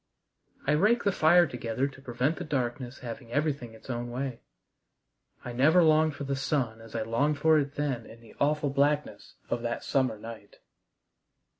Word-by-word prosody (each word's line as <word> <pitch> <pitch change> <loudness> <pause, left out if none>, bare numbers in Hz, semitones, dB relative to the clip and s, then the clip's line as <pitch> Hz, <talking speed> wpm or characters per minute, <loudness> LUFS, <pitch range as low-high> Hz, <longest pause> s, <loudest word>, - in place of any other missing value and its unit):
I 145 - +2
raked 210 +10 +3
the 200 - +4
fire 175 0 +5
together 125 -1 -2
to 135 -1 -12
prevent 130 +4 -1
the 180 - -4
darkness 130 -3 -3
having 115 0 -7
everything 140 -5 -1
its - - -16
own 120 -1 -3
way. 125 0 -4 1.0
I 125 - -5
never 155 +8 +5
longed 155 -1 +4
for 145 - -6
the 140 0 -1
sun 130 -5 -1
as 115 0 -12
I 115 - 0
longed 140 +7 +1
for 155 +1 +4
it 140 -1 -3
then 135 -6 -2
in 115 - -13
the 115 -2 -16
awful 150 0 +1
blackness 145 +2 0 0.2
of 120 - 0
that 120 0 -3
summer 130 -5 +1
night. 110 -1 -10
135 Hz, 175 wpm, -28 LUFS, 120-150 Hz, 1.0 s, fire